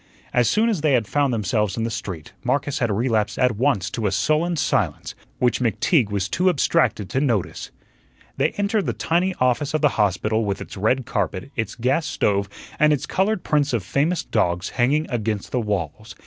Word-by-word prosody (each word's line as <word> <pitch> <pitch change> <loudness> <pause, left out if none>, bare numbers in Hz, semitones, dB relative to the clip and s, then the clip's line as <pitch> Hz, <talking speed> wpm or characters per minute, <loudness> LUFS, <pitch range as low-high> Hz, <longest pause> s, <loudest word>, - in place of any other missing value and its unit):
As 120 -2 +3
soon 220 +2 +2
as 210 -9 0
they 150 -2 +2
had 120 -4 +2
found 145 +1 +1
themselves 105 -2 0
in 115 - -1
the 115 - -2
street, 95 -8 -6
Marcus 145 0 0
had 120 - +1
relapsed 110 0 0
at 125 -3 +2
once 115 -5 +1
to 110 -3 -1
a - - 0
sullen 155 - +1
silence, 105 - -1 0.2
which 125 -3 +1
McTeague 115 - +2
was 100 -2 -1
too 185 - +2
abstracted 155 - +1
to 130 - 0
notice. 115 -10 -1 0.7
They - - +2
entered 205 0 0
the - - 0
tiny 180 +3 0
office 130 +4 +1
of 155 - 0
the 150 - +5
hospital 105 +1 +1
with 100 -2 -2
its - - -8
red 115 +6 +1
carpet, 100 +4 -3
its 110 -2 -3
gas 130 +6 0
stove, 100 -9 0 0.3
and 150 0 +5
its 145 -4 0
colored 195 0 0
prints 145 -2 +1
of 115 -5 0
famous 155 - 0
dogs 90 +2 0
hanging 140 +5 +1
against 110 -4 -3
the 125 - 0
walls. 105 +1 -4
120 Hz, 190 wpm, -22 LUFS, 105-150 Hz, 0.7 s, the